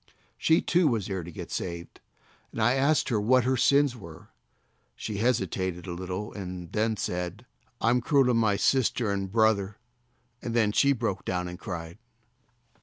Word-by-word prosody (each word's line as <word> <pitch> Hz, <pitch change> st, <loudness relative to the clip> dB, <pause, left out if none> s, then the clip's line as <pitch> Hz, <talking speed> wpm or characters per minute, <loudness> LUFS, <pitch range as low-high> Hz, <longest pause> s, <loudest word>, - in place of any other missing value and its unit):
She, 160 Hz, +2 st, +2 dB
too, 175 Hz, -1 st, +3 dB
was 115 Hz, -8 st, 0 dB
there 95 Hz, -2 st, -3 dB
to 85 Hz, +1 st, -9 dB
get -, -, -8 dB
saved, 85 Hz, -1 st, -5 dB, 0.5 s
and -, -, -7 dB
I 115 Hz, +3 st, +4 dB
asked 140 Hz, +1 st, +2 dB
what 120 Hz, +3 st, +3 dB
her 130 Hz, +2 st, +1 dB
sins 140 Hz, +1 st, +3 dB
were. 85 Hz, -8 st, -12 dB, 0.7 s
She 105 Hz, -2 st, -5 dB
hesitated 95 Hz, -6 st, -1 dB
a 90 Hz, -, -5 dB
little 95 Hz, +3 st, -5 dB
and 90 Hz, -4 st, -7 dB
then 110 Hz, 0 st, 0 dB
said: 90 Hz, +2 st, -4 dB, 0.3 s
"I'm 120 Hz, +2 st, +2 dB
cruel 140 Hz, +2 st, +3 dB
to 125 Hz, -, +3 dB
my 110 Hz, -3 st, +2 dB
sister 120 Hz, -1 st, +1 dB
and 100 Hz, -1 st, -3 dB
brother;" 105 Hz, -2 st, +2 dB, 0.6 s
and 115 Hz, -1 st, -4 dB
then 110 Hz, -3 st, +3 dB
she 140 Hz, +6 st, +4 dB
broke 115 Hz, -7 st, -2 dB
down 90 Hz, -1 st, -2 dB
and 90 Hz, +1 st, -8 dB
cried. 85 Hz, -4 st, -7 dB
105 Hz, 165 wpm, -27 LUFS, 90-125 Hz, 0.7 s, I